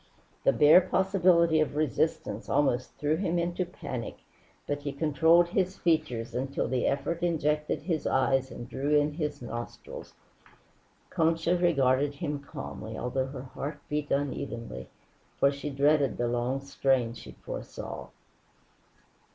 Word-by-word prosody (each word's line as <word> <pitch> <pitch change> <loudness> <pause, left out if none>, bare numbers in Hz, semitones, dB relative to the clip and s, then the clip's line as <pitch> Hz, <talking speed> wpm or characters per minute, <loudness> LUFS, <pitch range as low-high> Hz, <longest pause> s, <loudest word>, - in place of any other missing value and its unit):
The - - +5
bare 150 +5 +7
possibility 180 -3 +3
of 155 -1 0
resistance 150 -6 -1
almost 135 -3 +1
threw 150 +2 +1
him 175 -2 0
into 175 +1 -1
panic, 125 -9 -6 0.5
but 145 0 -2
he 145 0 -3
controlled 160 +3 +4
his 185 +1 0
features 155 -9 0
until 135 +2 -2
the 125 0 0
effort 160 +5 -1
injected 150 -4 0
his 165 -2 -1
eyes 130 0 +2
and 120 - -8
drew 145 +4 +1
in 145 +1 0
his 150 -5 -3
nostrils. 120 0 -7 1.0
Concha 165 +1 +2
regarded 145 -5 +2
him 145 -1 -3
calmly, 135 -6 -7
although 130 +2 -1
her 135 -1 -7
heart 140 +3 -6
beat 150 0 -2
unevenly, 130 - -3 0.5
for 140 - +5
she 140 +1 -5
dreaded 140 -1 +2
the 120 - 0
long 120 +3 -1
strain 135 -3 +1
she 115 - -11
foresaw. - - -7
145 Hz, 135 wpm, -29 LUFS, 130-165 Hz, 1.0 s, bare